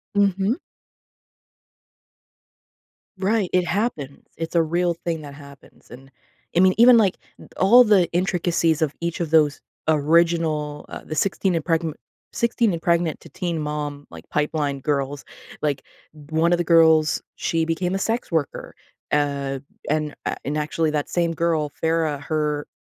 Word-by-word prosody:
Mhm. 200 Hz, +2 st, +2 dB, 2.6 s
Right, 195 Hz, 0 st, 0 dB
it 180 Hz, -1 st, +3 dB
happen. 170 Hz, -, -3 dB
It's 165 Hz, +1 st, -5 dB
a 170 Hz, -, +5 dB
real 170 Hz, +2 st, 0 dB
thing 165 Hz, -1 st, -4 dB
that 145 Hz, -1 st, -9 dB
happens. 140 Hz, -1 st, -16 dB
And, 135 Hz, +3 st, -13 dB, 0.4 s
I -, -, +4 dB
mean, 185 Hz, 0 st, +5 dB
even, 240 Hz, +1 st, +8 dB
like, 200 Hz, -5 st, +2 dB, 0.4 s
all 235 Hz, +7 st, +7 dB
the 205 Hz, -6 st, +4 dB
intricacies 170 Hz, -2 st, +1 dB
of 155 Hz, -2 st, +1 dB
each 170 Hz, 0 st, -3 dB
of 165 Hz, -3 st, -3 dB
those 150 Hz, -3 st, +3 dB, 0.3 s
original, 155 Hz, -1 st, +1 dB
uh, -, -, -7 dB
the 155 Hz, -, -5 dB
16 190 Hz, +1 st, 0 dB
and 165 Hz, -, -1 dB
Pregm 165 Hz, -1 st, 0 dB, 0.4 s
16 235 Hz, -3 st, +1 dB
and 165 Hz, -, -4 dB
Pregnant 170 Hz, -2 st, 0 dB
to -, -, -14 dB
Teen 170 Hz, -3 st, -3 dB
Mom, 150 Hz, -1 st, -4 dB
like, 80 Hz, 0 st, -12 dB
pipeline 150 Hz, -2 st, -1 dB
girls. 140 Hz, 0 st, -2 dB, 0.4 s
Like, 145 Hz, -3 st, -1 dB, 0.5 s
1 160 Hz, +2 st, +2 dB
of 175 Hz, -, +4 dB
the 175 Hz, -, -1 dB
girls, 160 Hz, -2 st, +4 dB
she 165 Hz, -1 st, -1 dB
became 175 Hz, +3 st, -1 dB
a -, -, +1 dB
sex 225 Hz, +4 st, -2 dB
worker. 160 Hz, -4 st, -2 dB, 0.4 s
Uh, 140 Hz, -2 st, 0 dB, 0.3 s
and, 150 Hz, 0 st, -1 dB
uh, -, -, -1 dB
and 145 Hz, +2 st, -2 dB
actually, 155 Hz, +1 st, 0 dB
that 150 Hz, -1 st, -1 dB
same 170 Hz, -1 st, 0 dB
girl, 160 Hz, -3 st, 0 dB
Farrah, 160 Hz, -3 st, 0 dB
her, 150 Hz, -1 st, -2 dB
160 Hz, 150 wpm, -23 LUFS, 150-175 Hz, 2.6 s, even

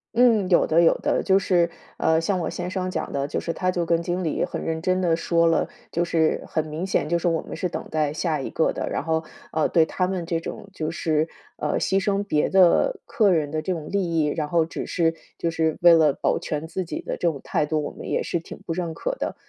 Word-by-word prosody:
嗯， 225 Hz, -6 st, +4 dB
有 175 Hz, -, +5 dB
的， 165 Hz, +2 st, +4 dB
有 165 Hz, -, +5 dB
的， -, -, +1 dB
就 190 Hz, 0 st, +3 dB
是， 175 Hz, -3 st, +2 dB, 0.3 s
呃， 160 Hz, 0 st, +3 dB
像 185 Hz, +3 st, 0 dB
我 170 Hz, -, -2 dB
先 180 Hz, 0 st, -4 dB
生 185 Hz, -1 st, -2 dB
讲 160 Hz, -3 st, -4 dB
的， 140 Hz, 0 st, -1 dB
就 -, -, -2 dB
是 165 Hz, -, -3 dB
他 185 Hz, +1 st, -1 dB
就 175 Hz, -2 st, 0 dB
跟 165 Hz, 0 st, +2 dB
经 175 Hz, +2 st, -2 dB
理 160 Hz, -, 0 dB
很 -, -, -4 dB
认 160 Hz, 0 st, -2 dB
真 185 Hz, +1 st, +1 dB
地 170 Hz, -3 st, +3 dB
说 170 Hz, 0 st, +2 dB
了， 165 Hz, 0 st, +2 dB, 0.2 s
就 170 Hz, -, +1 dB
是 165 Hz, -2 st, +1 dB
很 160 Hz, -1 st, -1 dB
明 155 Hz, +5 st, -4 dB
显， 185 Hz, -, 0 dB
就 170 Hz, +2 st, +1 dB
是 170 Hz, -, -1 dB
我 165 Hz, -1 st, +1 dB
们 -, -, -7 dB
是 180 Hz, +2 st, -2 dB
等 -, -, -5 dB
待 155 Hz, -2 st, +1 dB
下 155 Hz, -1 st, -1 dB
一 -, -, -4 dB
个 160 Hz, -, +1 dB
的。 -, -, -3 dB
然 -, -, -2 dB
后， 160 Hz, 0 st, 0 dB, 0.3 s
呃， 155 Hz, -1 st, +1 dB
对 165 Hz, -2 st, +4 dB
他 180 Hz, +3 st, -1 dB
们 185 Hz, -2 st, -3 dB
这 165 Hz, 0 st, -1 dB
种 165 Hz, -, -7 dB
就 155 Hz, -4 st, -3 dB
是， 160 Hz, -1 st, 0 dB, 0.3 s
呃， -, -, -1 dB
牺 195 Hz, 0 st, +1 dB
牲 200 Hz, 0 st, +1 dB
别 155 Hz, -7 st, +1 dB
的 190 Hz, -, +4 dB
客 215 Hz, -3 st, +2 dB
人 150 Hz, -4 st, +1 dB
的 155 Hz, -, -1 dB
这 175 Hz, -, -3 dB
种 160 Hz, -4 st, -4 dB
利 200 Hz, -, +1 dB, 0.2 s
益， 155 Hz, -, +3 dB
然 150 Hz, +1 st, -1 dB
后 165 Hz, +1 st, +2 dB
只 165 Hz, -, -6 dB
是 165 Hz, -2 st, +1 dB, 0.2 s
就 170 Hz, -, -1 dB
是 160 Hz, -1 st, 0 dB
为 175 Hz, -1 st, +8 dB
了 155 Hz, -3 st, +5 dB
保 -, -, 0 dB
全 155 Hz, +1 st, -4 dB
自 185 Hz, +3 st, -3 dB
己 170 Hz, -, -5 dB
的 -, -, -3 dB
这 175 Hz, -, -1 dB
种 140 Hz, -, -8 dB
态 150 Hz, -, 0 dB
度， 155 Hz, 0 st, 0 dB
我 -, -, -4 dB
们 -, -, -9 dB
也 -, -, 0 dB
是 170 Hz, -, -1 dB
挺 165 Hz, -, -10 dB
不 165 Hz, -, -2 dB
认 170 Hz, -2 st, -3 dB
可 -, -, -2 dB
的。 -, -, -3 dB
165 Hz, 280 characters per minute, -24 LUFS, 160-180 Hz, 0.3 s, 为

